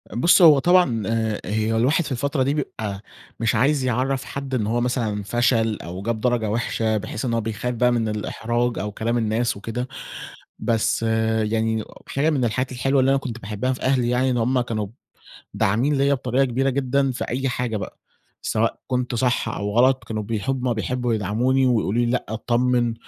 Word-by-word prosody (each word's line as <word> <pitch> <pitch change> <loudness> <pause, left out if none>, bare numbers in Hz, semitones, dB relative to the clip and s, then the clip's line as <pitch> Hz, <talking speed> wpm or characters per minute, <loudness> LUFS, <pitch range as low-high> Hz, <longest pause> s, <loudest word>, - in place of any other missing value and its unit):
بُصّ 170 +10 +5
هو 155 -5 +8
طبعًا 175 - +3
آآ، 110 -1 -1
هي 110 +3 0
الواحد 135 +9 +3
في 150 - -6
الفترة 135 +2 0
دي 140 +2 +1
بيبقى 110 -9 -4 0.4
مش 115 -1 +1
عايز 140 +1 +2
يعَرّف 130 +2 0
حد 140 -1 -6
إن 110 -4 0
هو 120 +2 0
مثلًا 115 -4 -1
فشل 115 0 +1
أو 90 +3 -6
جاب 115 +2 -2
درجة 120 -3 +1
وحشة 110 -1 0
بحيث 110 +3 -4
إن 120 - -1
هو 115 - +1
بيخاف 110 +3 -3
بقى 125 +1 +3
من 115 -2 0
الإحراج 120 +3 -2
أو 105 +1 -3
كلام 115 +3 -1
الناس 115 0 0
وكده، 115 +5 -4 0.7
بس 115 -1 0 0.4
يعني 110 0 0 0.2
حاجة 145 +4 +1
من 140 -5 +1
الحاجات 125 +3 -1
الحلوة 135 +2 +1
اللي 130 +1 +3
أنا 135 - +3
كنت 125 -4 -6
باحبها 110 +4 -2
في 125 - -6
أهلي 130 -2 +2
يعني 125 +2 +2
إن 125 - 0
هُم 125 +2 +2
كانوا 110 -4 -2 0.7
داعمين 120 +9 +1
ليَّ 140 +1 +3
بطريقة 130 0 +1
كبيرة 135 +2 0
جدًا 135 0 +1
في 125 - -4
أي 135 +2 -1
حاجة 120 -3 -2
بقى، 100 - -7 0.4
سواء 115 +1 0
كنت 125 -1 -1
صح 125 -1 +1
أو 105 -1 -3
غلَط، 130 +2 +4
كانوا 110 -1 -4
بيحب 125 +5 -2
هُم 120 - +2
بيحبوا 120 +3 -1
يدعَموني 120 +6 +1
ويقولوا 110 -5 +1
لي: - - +2
"لأ، 125 - -1
اتطمّن 120 +2 +1
120 Hz, 185 wpm, -23 LUFS, 110-130 Hz, 0.7 s, هو